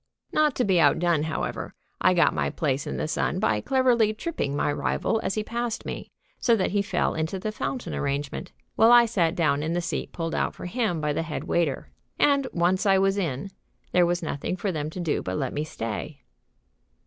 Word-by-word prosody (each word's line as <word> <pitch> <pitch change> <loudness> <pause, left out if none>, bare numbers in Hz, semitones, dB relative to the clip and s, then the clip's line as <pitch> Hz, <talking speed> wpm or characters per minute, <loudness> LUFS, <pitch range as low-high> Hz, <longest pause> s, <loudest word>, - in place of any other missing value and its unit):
Not 305 -3 +3
to 250 - +1
be 190 -3 +3
outdone, 165 +1 +3
however, 155 - -4 0.3
I 185 - +4
got 175 - +4
my - - 0
place 140 -3 -1
in - - -3
the - - -2
sun 165 - -1
by 110 - +1
cleverly 240 - +3
tripping 215 - -3
my 145 - +1
rival 225 - 0
as - - -2
he 215 - -1
passed 235 +1 -3
me, - - -6 0.3
so 235 - +4
that 190 - 0
he 200 0 +2
fell 200 - 0
into 160 +4 -2
the 215 +3 -3
fountain 250 +3 -4
arrangement, 145 +5 -3 0.2
while 225 +1 +6
I 240 0 +8
sat 185 -7 +1
down 150 -5 +2
in 160 +2 -1
the 175 - +1
seat 175 +1 -3
pulled 165 -1 -4
out - - -1
for - - -8
him 195 -4 -1
by 150 -1 0
the 150 - -1
head 160 -2 -4
waiter. 165 -6 -1 0.3
And, 280 -2 +3
once 180 +4 +1
I 195 -1 +5
was 195 +1 +2
in, 165 +1 -3 0.4
there 180 -1 +4
was 175 0 -1
nothing 155 +4 -3
for 195 +2 -1
them 155 -3 -3
to 170 - -8
do 170 -4 0
but 95 0 -3
let - - -2
me 150 - -1
stay. 125 0 -5
175 Hz, 210 wpm, -26 LUFS, 155-215 Hz, 0.4 s, I